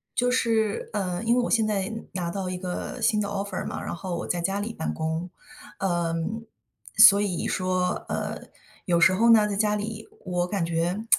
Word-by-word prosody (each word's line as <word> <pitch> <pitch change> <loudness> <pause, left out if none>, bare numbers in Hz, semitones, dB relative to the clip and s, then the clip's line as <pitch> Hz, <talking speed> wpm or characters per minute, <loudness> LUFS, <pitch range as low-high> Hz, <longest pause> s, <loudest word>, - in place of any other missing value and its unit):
就 245 0 +2
是， 225 -4 +1
呃， 185 -4 -2
因 235 +1 +3
为 250 - +3
我 - - -2
现 225 -2 +3
在 205 0 -1 0.2
拿 175 -2 -2
到 190 -1 -3
一 180 - -3
个 180 -1 -5
新 215 - +3
的 205 - -1
Offer 200 -1 -3
嘛， - - -5
然 - - -4
后 180 0 -4
我 - - -4
在 175 - -1
家 195 +3 -1
里 225 +2 -4
办 160 - -3
公。 160 +2 -3 0.5
嗯， 175 +4 -1 0.5
所 200 +1 +9
以 190 -5 -1
说， 185 0 -1
呃， - - -3 0.4
有 170 -3 +2
时 185 - +6
候 230 +5 +4
呢， 215 -2 +5
在 200 - -2
家 210 0 +2
里 215 +1 -5 0.2
我 180 -1 -1
感 190 -2 -1
觉， 170 +6 -1
195 Hz, 230 characters per minute, -26 LUFS, 175-215 Hz, 0.5 s, 所